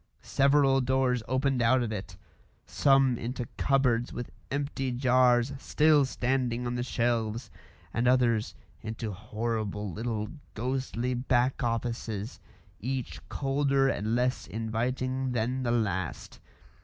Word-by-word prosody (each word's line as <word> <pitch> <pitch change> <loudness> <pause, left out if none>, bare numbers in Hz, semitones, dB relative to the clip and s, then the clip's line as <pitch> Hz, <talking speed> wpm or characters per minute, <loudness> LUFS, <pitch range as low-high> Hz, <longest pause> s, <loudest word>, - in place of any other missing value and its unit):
Several 135 -1 +3
doors 130 -1 +1
opened 130 0 +1
out 125 +2 +4
of 115 - -3
it 95 -3 -6 0.5
some 135 -3 +3
into 125 +1 -4
cupboards 125 -4 +2
with 120 - -6 0.2
empty 140 -2 -2
jars 125 0 +3
still 150 -1 +4
standing 125 -2 -1
on 120 - -2
the 120 - -2
shelves, 115 -1 -1 0.4
and 120 +2 +1
others 120 -4 +2 0.3
into 110 0 -4
horrible 105 -1 -3
little 110 -1 -3 0.3
ghostly 125 +1 -2
back 125 +1 +1
offices, 115 -2 -3 0.4
each 130 +2 -3
colder 135 -1 +1
and 110 0 -1
less 125 +1 0
inviting 125 +5 -2
than 125 +3 -1
the 125 - -1
last. 100 -7 -2
125 Hz, 120 wpm, -29 LUFS, 115-130 Hz, 0.5 s, out